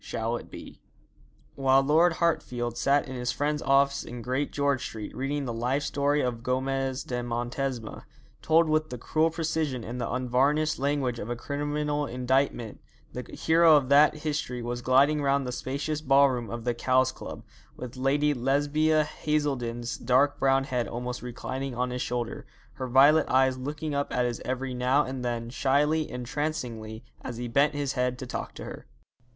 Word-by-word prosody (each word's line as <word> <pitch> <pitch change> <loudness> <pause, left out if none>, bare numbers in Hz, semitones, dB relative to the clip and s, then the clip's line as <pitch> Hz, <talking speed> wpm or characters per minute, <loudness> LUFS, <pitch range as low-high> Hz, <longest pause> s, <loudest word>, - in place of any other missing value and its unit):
'SHALL 115 +1 -2
IT - - -11
BE?' - - -11 0.7
While 135 0 +3
Lord 160 +5 +4
Hartfield 125 -8 -1
sat 140 +4 +2
in 130 - -6
his 125 -1 -2
friend's 150 +1 -1
office 140 0 +3
in 120 0 -8
Great 130 +4 -1
George 140 -2 0
Street 110 -2 -7
reading 140 +2 -2
the 120 - -3
life 125 +5 -1
story 145 +1 +1
of 120 -2 -2
Gomez 130 +1 -1
de 125 -1 -3
Montesma, 120 0 -4 0.4
told 160 +1 +4
with 155 0 +1
the 125 - -5
cruel 155 +7 +1
precision 160 -6 -2
and 120 +2 -5
the 120 - -2
unvarnished 135 +5 +1
language 135 -4 0
of 105 - -6
a 120 - -1
criminal 145 +2 -2
indictment, 125 -3 -1 0.3
the 125 - -7
hero 165 0 +5
of 135 -3 +2
that 145 +2 +6
history 145 -5 -3
was 120 +1 -3
gliding 140 +4 +4
round 140 -1 +1
the 125 - -3
spacious 140 +5 -3
ballroom 135 -4 +3
of 120 0 -5
the 120 0 0
Cowes 130 +2 +2
Club, - - -9 0.3
with 125 0 -7
Lady 145 +3 +2
Lesbia 145 +4 +2
Haselden's 135 -6 -2
dark 130 +4 +2
brown 135 0 +3
head 125 -3 -2
almost 125 +1 -5
reclining 130 +2 -5
on 125 +1 -1
his 125 0 -3
shoulder, 120 -1 -3 0.3
her 130 - -5
violet 140 +5 +5
eyes 130 0 +3
looking 150 +3 -4
up 140 0 -1
at 125 0 +1
his 120 -1 -3
every 130 0 -3
now 125 +4 +2
and 130 -1 -5
then, 120 -1 -3
shyly, 145 +3 +1
entrancingly, 120 -4 -4 0.2
as 120 - -6
he 120 0 -4
bent 140 +5 +2
his 145 -2 -1
head 125 -1 0
to 130 - -6
talk - - -5
to - - -8
her. - - -9
135 Hz, 175 wpm, -27 LUFS, 125-145 Hz, 0.7 s, that